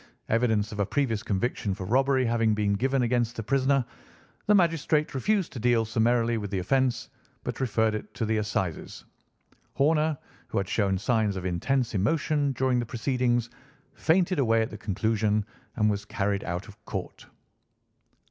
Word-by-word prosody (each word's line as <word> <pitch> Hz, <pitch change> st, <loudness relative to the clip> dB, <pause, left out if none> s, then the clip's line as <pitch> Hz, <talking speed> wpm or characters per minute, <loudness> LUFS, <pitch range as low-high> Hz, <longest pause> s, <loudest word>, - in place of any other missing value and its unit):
Evidence 110 Hz, -2 st, +1 dB
of 105 Hz, -, -7 dB
a 100 Hz, -, +2 dB
previous 120 Hz, -7 st, 0 dB
conviction 100 Hz, -1 st, -1 dB
for 95 Hz, -, -6 dB
robbery 130 Hz, +4 st, +2 dB
having 115 Hz, -2 st, +2 dB
been 105 Hz, -1 st, +1 dB
given 130 Hz, +5 st, +1 dB
against 120 Hz, -1 st, 0 dB
the 115 Hz, -, -4 dB
prisoner, 135 Hz, +2 st, +2 dB, 0.6 s
the 210 Hz, -, +5 dB
magistrate 165 Hz, -4 st, +2 dB
refused 190 Hz, -, 0 dB
to 125 Hz, -, -6 dB
deal 120 Hz, -1 st, +2 dB
summarily 115 Hz, +1 st, +1 dB
with 105 Hz, -1 st, -5 dB
the 100 Hz, -, -2 dB
offence, 130 Hz, +7 st, +1 dB, 0.4 s
but -, -, -4 dB
referred 110 Hz, -4 st, +1 dB
it 110 Hz, -, -5 dB
to 115 Hz, -, -1 dB
the 110 Hz, 0 st, 0 dB
Assizes. 95 Hz, -6 st, -3 dB, 0.7 s
Horner, 155 Hz, +1 st, +2 dB, 0.3 s
who -, -, -4 dB
had 100 Hz, -, 0 dB
shown 95 Hz, -1 st, +1 dB
signs 110 Hz, 0 st, +1 dB
of 95 Hz, -1 st, -5 dB
intense 115 Hz, +8 st, 0 dB
emotion 145 Hz, -, +1 dB
during 130 Hz, -1 st, +1 dB
the 120 Hz, -, -2 dB
proceedings, 120 Hz, -1 st, 0 dB, 0.4 s
fainted 180 Hz, +1 st, +2 dB
away 115 Hz, -3 st, +3 dB
at 110 Hz, -, -5 dB
the -, -, -7 dB
conclusion 105 Hz, 0 st, 0 dB, 0.3 s
and 105 Hz, -2 st, +2 dB
was 105 Hz, -1 st, 0 dB
carried 100 Hz, -1 st, -1 dB
out 90 Hz, +1 st, -4 dB
of -, -, -15 dB
court." -, -, -6 dB
115 Hz, 165 wpm, -27 LUFS, 105-135 Hz, 0.7 s, the